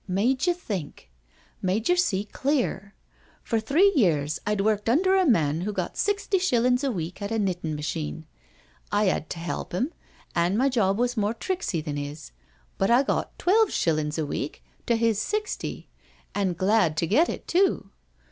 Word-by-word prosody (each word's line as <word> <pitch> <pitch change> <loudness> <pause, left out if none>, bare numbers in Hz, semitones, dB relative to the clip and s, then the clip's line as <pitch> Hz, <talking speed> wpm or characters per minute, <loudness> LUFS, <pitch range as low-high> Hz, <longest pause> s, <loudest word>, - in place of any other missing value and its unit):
" - - -38
Made 260 - +1
yer 355 - +4
think— 185 - -6 0.5
made 195 +4 0
yer 355 - +4
see 205 - +1
CANTERBURY 210 - -25
TALES 280 +2 +2
iii 270 - +4
clear. 200 0 -6 0.5
For 225 - 0
three 315 - +4
years 155 - +2
I'd 210 -1 +1
worked 210 +1 +1
under 375 +10 +3
a 375 -2 +3
man 160 - +2
who 205 +4 -2
got - - -3
sixty 405 -1 0
$hillin*s 250 -6 +2
a 275 - +1
week 175 -1 -5
at 200 +1 -4
a 225 - 0
knittin* 180 -6 -1
machine. 80 - -4 0.7
I 205 -1 +3
'ad 160 - -2
to 170 - -5
'elp 170 0 -5
him, 250 - -1 0.4
an' 175 +4 +1
my 265 +3 +3
job 200 -6 +1
was 245 +1 0
more 215 0 0
tricksy 230 - -2
than 145 -2 -4
'is, 145 +1 -7 0.5
but 195 - +2
I 245 +3 +5
got - - -2
twelve 425 +3 +3
shillin's 155 - 0
a 160 - 0
week 145 0 -4 0.2
to 235 - +3
his 225 -2 +1
sixty, 425 - -3 0.5
an' 195 -3 0
glad 185 -3 +2
to 165 - +1
get 275 - +3
it - - -6
too. 345 - +1
210 Hz, 190 wpm, -26 LUFS, 170-265 Hz, 0.7 s, I